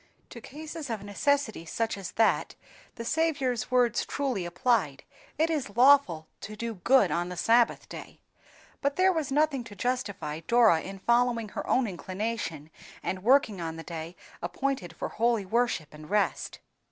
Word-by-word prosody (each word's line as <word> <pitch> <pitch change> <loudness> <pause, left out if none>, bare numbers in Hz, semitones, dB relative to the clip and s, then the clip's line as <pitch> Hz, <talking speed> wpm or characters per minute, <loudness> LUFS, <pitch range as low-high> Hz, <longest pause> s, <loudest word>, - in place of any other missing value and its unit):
To 235 - -9
cases 305 +2 -8
of 220 -3 -4
necessity 220 - 0
such 225 +7 -2
as 195 -2 -7
that, 225 -1 +2 0.4
the 230 - -6
Saviour's 275 -6 0
words 245 -3 +2
truly 260 -10 -2
applied—"It 195 - -1
is 250 -9 -3
lawful 250 - +5
to 215 - -8
do 230 +1 -4
good 210 +1 +3
on 175 +1 -1
the 180 - -6
Sabbath 230 +5 +3
day;" - - -10 0.6
but 280 0 0
there 375 0 +4
was 310 -5 -2
nothing 290 -2 +2
to 205 - -11
justify 200 -9 -2
Dora 220 -2 +4
in 195 +1 -7
following 235 +1 +1
her - - -6
own 255 - +3
inclination, 185 -5 -4 0.3
and 185 - -3
working 235 -6 +3
on 165 -1 -4
the 165 - -8
day 165 +1 -7 0.3
appointed 180 -1 -3
for - - -4
holy 230 -2 +1
worship 220 -8 0
and 150 +1 -12
rest. 205 -1 0
230 Hz, 155 wpm, -28 LUFS, 180-260 Hz, 0.6 s, lawful